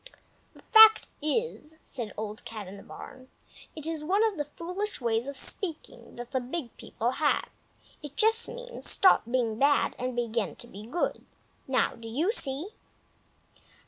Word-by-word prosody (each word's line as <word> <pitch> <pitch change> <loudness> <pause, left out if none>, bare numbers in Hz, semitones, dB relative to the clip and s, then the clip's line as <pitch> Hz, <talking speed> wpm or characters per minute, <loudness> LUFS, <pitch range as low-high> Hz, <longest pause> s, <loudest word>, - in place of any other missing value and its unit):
"The - - -17
fact 440 0 +9
is," 315 -1 -2
said 235 -6 -6
Old 215 0 -5
Cat 215 -4 -7
in 195 +2 -9
the - - -11
Barn, 255 +5 -11 0.5
"it 310 -2 -8
is 320 -2 -3
one 390 +7 +2
of 440 -3 +1
the 295 -3 -2
foolish 370 +5 -3
ways 235 +1 0
of 280 -1 -5
speaking 330 +2 -4
that 240 0 -8
the 260 - +1
Big 250 0 -5
People 235 +2 -2
have. 295 +3 0 0.5
It 295 -2 -9
just 450 +2 +4
means, - - -4
stop 380 - +6
being 235 -3 0
bad 285 +1 +3
and 250 0 -3
begin 230 -8 -1
to - - -9
be 210 -1 -11
good. 320 +9 -2 0.4
Now 265 -1 +2
do 230 -1 -8
you 310 - +1
see?" 300 - -1
280 Hz, 165 wpm, -28 LUFS, 235-360 Hz, 0.5 s, fact